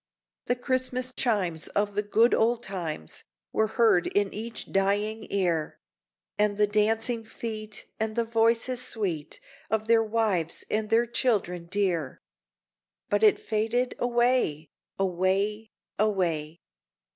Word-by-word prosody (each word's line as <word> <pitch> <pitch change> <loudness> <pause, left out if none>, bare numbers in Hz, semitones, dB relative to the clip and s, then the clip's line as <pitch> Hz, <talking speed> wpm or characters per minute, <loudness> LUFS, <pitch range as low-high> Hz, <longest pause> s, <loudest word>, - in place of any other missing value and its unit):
The 245 - +2
Christmas 255 0 -1
chimes, 190 -11 0
of 205 0 -1
the 205 - +1
good 220 +3 +3
old 235 +1 +2
times, 165 - -5 0.3
Were 220 - +2
heard 220 -5 +3
in 205 -1 0
each 225 +1 -6
dying 205 +3 0
ear, 175 -6 -1 0.6
And 210 -1 +2
the 210 - +5
dancing 225 +3 +1
feet, 215 -2 -5
and 220 0 -2
the 235 -1 +1
voices 230 +2 +2
sweet 180 -12 -2 0.3
Of 220 0 -1
their 230 0 +5
wives 210 -7 0
and 215 0 0
their 230 +2 +4
children 205 -8 0
dear! 175 -7 -1 0.9
But 205 0 +2
it 215 -1 +6
faded 225 +3 -1
away 240 -10 +1 0.3
away 195 +4 0 0.3
away! 170 -7 0
215 Hz, 120 wpm, -27 LUFS, 195-230 Hz, 0.9 s, it